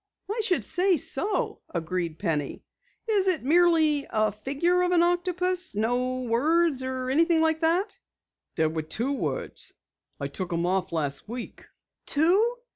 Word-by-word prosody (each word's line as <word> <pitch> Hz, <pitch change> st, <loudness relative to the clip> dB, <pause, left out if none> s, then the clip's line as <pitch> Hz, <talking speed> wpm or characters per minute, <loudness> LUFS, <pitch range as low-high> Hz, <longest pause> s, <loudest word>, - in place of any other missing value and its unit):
"I 445 Hz, +1 st, -1 dB
should 370 Hz, -5 st, +1 dB
say 360 Hz, +2 st, +2 dB
so," 420 Hz, -, -1 dB
agreed 170 Hz, -1 st, -3 dB
Penny. 155 Hz, -7 st, -2 dB, 0.4 s
"Is 405 Hz, -4 st, +2 dB
it 365 Hz, -8 st, +2 dB
merely 315 Hz, -1 st, +3 dB
a 215 Hz, -1 st, +1 dB
figure 285 Hz, -, 0 dB
of 360 Hz, 0 st, +1 dB
an 340 Hz, -1 st, +5 dB
octopus? 360 Hz, -, 0 dB
No 250 Hz, +4 st, 0 dB
words 290 Hz, +5 st, +2 dB
or 260 Hz, 0 st, -3 dB
anything 330 Hz, +3 st, +3 dB
like 320 Hz, 0 st, +2 dB
that?" 355 Hz, +6 st, +1 dB, 0.6 s
"There 160 Hz, 0 st, 0 dB
are 160 Hz, -, 0 dB
two 220 Hz, -, -2 dB
words. 280 Hz, -, -4 dB, 0.5 s
I -, -, -3 dB
took 185 Hz, -2 st, -4 dB
'em 170 Hz, +1 st, 0 dB
off 185 Hz, +1 st, 0 dB
last 150 Hz, +2 st, -2 dB
week." 240 Hz, +1 st, -8 dB, 0.4 s
"Two?" 390 Hz, +11 st, +2 dB
290 Hz, 145 wpm, -26 LUFS, 215-355 Hz, 0.6 s, an